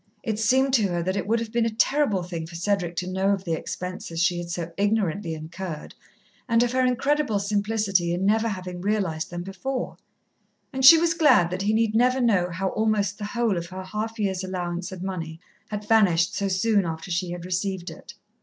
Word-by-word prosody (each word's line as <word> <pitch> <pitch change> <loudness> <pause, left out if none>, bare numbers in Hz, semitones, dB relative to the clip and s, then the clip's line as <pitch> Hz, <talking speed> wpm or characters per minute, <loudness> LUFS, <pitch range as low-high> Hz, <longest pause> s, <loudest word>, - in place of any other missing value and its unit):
It 215 -2 -2
seemed 260 +4 +3
to 220 -6 +4
her 175 -2 -2
that 185 +2 -1
it 200 - -2
would 230 +2 +2
have 230 -1 -5
been 235 -1 +1
a - - +1
terrible 225 -3 +1
thing 170 -2 -5
for 170 - -11
Cedric 175 -1 -1
to 180 +2 -3
know 190 +1 0
of 195 -1 -3
the 170 -3 -2
expenses 180 0 -5
she 175 +1 +2
had 175 0 -6
so 170 -1 -4
ignorantly 200 -4 0
incurred, 160 +1 -7 0.6
and 230 0 +4
of 240 - 0
her 255 0 +2
incredible 265 -1 +1
simplicity 200 -3 0
in 180 +2 -1
never 220 +3 +3
having 185 -4 -5
realized 190 -6 -1
them 175 0 -5
before, 245 +8 -4 0.8
and 265 0 -2
she 315 +5 +11
was 335 +1 +2
glad 295 - +4
that 185 +1 -3
he 205 +2 +1
need 220 0 +2
never 250 +3 +3
know 200 -8 +2
how 185 +3 -2
almost 210 -2 0
the 205 - -4
whole 230 -2 0
of 170 0 -4
her 185 +1 -7
half 215 +4 -4
year's 195 -3 -1
allowance 180 -1 -4
of 185 -1 -7
money 165 -4 -5 0.3
had 210 0 -5
vanished 180 -7 +4
so 200 - -1
soon 200 +2 +2
after 165 +2 -5
she 175 +1 -1
had 175 0 -6
received 185 0 -2
it. - - -12
195 Hz, 210 wpm, -25 LUFS, 175-220 Hz, 0.8 s, she